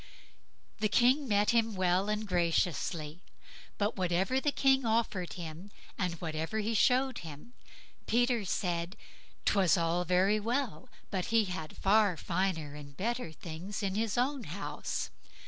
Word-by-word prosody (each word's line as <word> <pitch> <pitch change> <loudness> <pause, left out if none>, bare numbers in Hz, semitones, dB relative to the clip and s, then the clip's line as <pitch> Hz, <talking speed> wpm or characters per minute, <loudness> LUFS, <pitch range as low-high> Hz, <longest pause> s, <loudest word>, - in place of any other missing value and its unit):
The 215 0 +1
King 255 +6 +4
met 205 0 +3
him 225 -2 +2
well 185 +2 +2
and 210 0 -1
graciously; 170 -2 0 0.6
but 205 +2 0
whatever 190 +8 +1
the 295 - +1
King 270 -1 +3
offered 220 -6 0
him, 170 +2 -8 0.3
and 180 -3 -1
whatever 160 +4 -3
he 220 +1 0
showed 255 +3 +3
him, 160 +9 -10 0.5
Peter 240 -1 +2
said, 175 -1 -2 0.5
'twas 190 -3 +4
all 170 +1 +1
very 185 +4 +3
well, 245 +3 -2 0.2
but 185 -3 -1
he 230 -2 +3
had 180 -5 -6
far 200 -3 +3
finer 170 -5 -1
and 145 -1 -11
better 235 -3 -2
things 175 +6 -6
in 195 -1 0
his 220 +1 -1
own 260 0 0
house. 180 +6 -4
195 Hz, 140 wpm, -31 LUFS, 175-230 Hz, 0.6 s, King